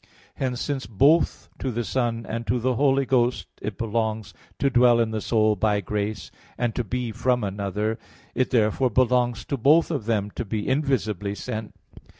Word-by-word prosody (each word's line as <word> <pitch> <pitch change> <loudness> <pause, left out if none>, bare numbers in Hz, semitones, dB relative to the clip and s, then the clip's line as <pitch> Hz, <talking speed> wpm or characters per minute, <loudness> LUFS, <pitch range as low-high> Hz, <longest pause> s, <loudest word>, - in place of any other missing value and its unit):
Hence, 125 -2 -2
since 135 -1 -3
both 140 - +3
to 130 - -2
the 120 -1 -2
Son 115 -1 -1
and 115 +1 -4
to 125 - +1
the 130 +2 +1
Holy 135 +1 +2
Ghost 125 -1 +1 0.2
it 105 -1 -4
belongs 110 -1 -2 0.2
to 140 - +1
dwell 120 -1 +5
in 115 -1 +1
the 110 -1 -2
soul 110 -1 +2
by 105 +1 +1
grace, 105 0 -3 0.3
and 120 -2 0
to 120 - -1
be 120 +1 -3
from 125 +2 0
another, 100 +3 -2 0.3
it 130 - 0
therefore 120 +2 +2
belongs 125 0 +1
to 140 - -2
both 150 +8 +4
of 140 -9 -2
them 105 -3 0
to - - -4
be 105 -1 -3
invisibly 110 - 0
sent. 110 +1 -6
115 Hz, 175 wpm, -24 LUFS, 110-130 Hz, 0.3 s, dwell